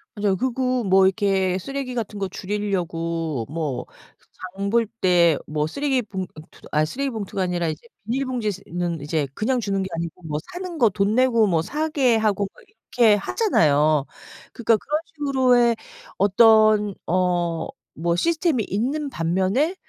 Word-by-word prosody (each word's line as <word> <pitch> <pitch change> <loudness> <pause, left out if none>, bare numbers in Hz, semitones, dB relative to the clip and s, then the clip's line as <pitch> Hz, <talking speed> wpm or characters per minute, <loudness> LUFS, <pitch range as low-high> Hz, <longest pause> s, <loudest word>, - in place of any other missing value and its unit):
맞아요. 205 -2 +1
그리고 255 +2 -1
뭐 190 -1 +5
이렇게 190 -1 +1
쓰레기 270 +4 -5
같은 215 -3 -4
거 195 - -1
줄이려고 170 - -3
뭐 150 -4 -3
그 - - -25 0.3
장 200 0 -2
볼 230 +2 +3
때 175 -5 +4
뭐 150 0 -1
쓰레기 270 - 0
봉 195 -4 -5
어 160 -4 -11
투 - - -19
아 150 - +3
쓰레기봉투가 220 - -3
아니라 175 -2 -1
이제 155 -1 -5 0.2
비닐봉지 245 -2 -1
스 195 0 -9
는 175 -1 -3 0.3
그냥 250 - 0
주는 195 -2 -1
게 - - -3
아니고 170 +1 -5
뭐 155 -2 -3
사는 355 -1 -6
거 235 -6 +4
돈 200 +2 0
내고 240 -4 +4
뭐 170 -4 +2
사게 280 - +1
하고 205 -2 +1
막 - - -19
이렇게 240 - +2
하잖아요. 155 - +2 0.5
그러니까 230 -1 +2
그런 300 +7 -2 0.2
식으로의 255 -5 +3 0.4
어떤 215 0 +5
어 175 -2 0 0.3
뭐 170 +1 -1
시스템이 320 - +1
있는 270 +10 -2
반면에 190 - 0
205 Hz, 305 characters per minute, -23 LUFS, 175-250 Hz, 0.5 s, 뭐